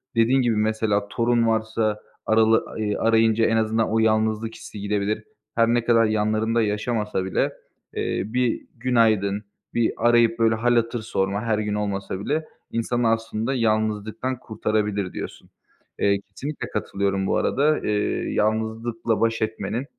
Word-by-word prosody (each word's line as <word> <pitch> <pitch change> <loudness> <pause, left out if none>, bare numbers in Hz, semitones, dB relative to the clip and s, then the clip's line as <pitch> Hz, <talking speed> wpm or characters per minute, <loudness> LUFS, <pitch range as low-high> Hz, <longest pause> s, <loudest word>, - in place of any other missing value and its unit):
Dediğin 120 +4 +4
gibi, 120 -3 +1
mesela 105 -1 +1
torun 115 +1 +1
varsa 110 -1 0 0.3
arala 110 0 +3
eee, 105 -1 0
arayınca 115 0 +3
en 115 - +2
azından 110 0 +1
o 110 - +2
yalnızlık 110 0 +1
hissi 105 - -10
gidebilir. 105 +1 -1 0.3
Her 115 0 +4
ne 120 0 +1
kadar 115 -1 +4
yanlarında 110 +2 +1
yaşamasa 105 -2 -1
bile, 95 - 0 0.4
eee, - - -1
bir 125 +1 0
günaydın, 110 -4 +2 0.3
bir 115 -1 +1
arayıp 120 -1 +3
böyle 115 -1 +4
hâl 120 +2 +2
hatır 115 0 0
sorma 100 -2 -1
her 110 -2 +1
gün 105 -1 -2
olmasa 100 -2 -3
bile 150 +10 -1 0.3
insanı 115 0 0
aslında 115 +2 -1
yalnızlıktan 110 +2 -1
kurtarabilir 105 -4 -2
diyorsun. - - -7 0.5
Eee, 100 0 +3
kesinlikle 150 +2 -5
katılıyorum 100 -2 -1
bu - - +1
arada. 150 +3 +2
Eee, 105 -1 -1
yalnızlıkla 110 +1 -1
baş 115 0 +1
etmenin, 110 +3 -2
110 Hz, 140 wpm, -24 LUFS, 105-115 Hz, 0.5 s, Dediğin